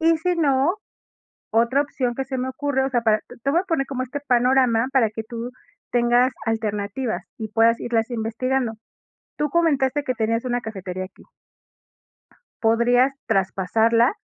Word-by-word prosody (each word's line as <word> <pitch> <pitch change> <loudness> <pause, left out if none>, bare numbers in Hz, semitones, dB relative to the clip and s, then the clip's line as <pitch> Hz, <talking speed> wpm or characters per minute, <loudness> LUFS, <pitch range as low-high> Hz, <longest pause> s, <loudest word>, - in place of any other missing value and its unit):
Y 330 0 +4
si 355 +2 0
no, 285 +2 +2 0.8
otra 235 +5 +3
opción 255 -4 -2
que 270 - -3
se 265 -1 -4
me 255 +1 -2
ocurre, 265 0 -1
o 270 - -1
sea, 245 - +1
para 215 -2 +3
te 245 - -12
te 275 - +1
voy 335 +5 +3
a - - -6
poner 320 -6 0
como 255 -2 -3
este 280 +3 -5
panorama 250 -1 +3
para 235 -6 +3
que 220 0 -5
tú 235 +1 -6 0.4
tengas 245 +1 +3
alternativas 215 -1 -2 0.2
y 220 -1 -4
puedas 225 +2 +3
irlas 230 0 -1
investigando. 240 +1 -1 0.6
Tú 300 -1 0
comentaste 290 -4 +1
que 255 - -1
tenías 230 +2 -1
una 245 -1 -1
cafetería 190 -4 -5
aquí. 185 - -17 1.4
Podrías 245 +4 +3
traspasarla, 225 - +2
245 Hz, 160 wpm, -23 LUFS, 225-270 Hz, 1.4 s, Y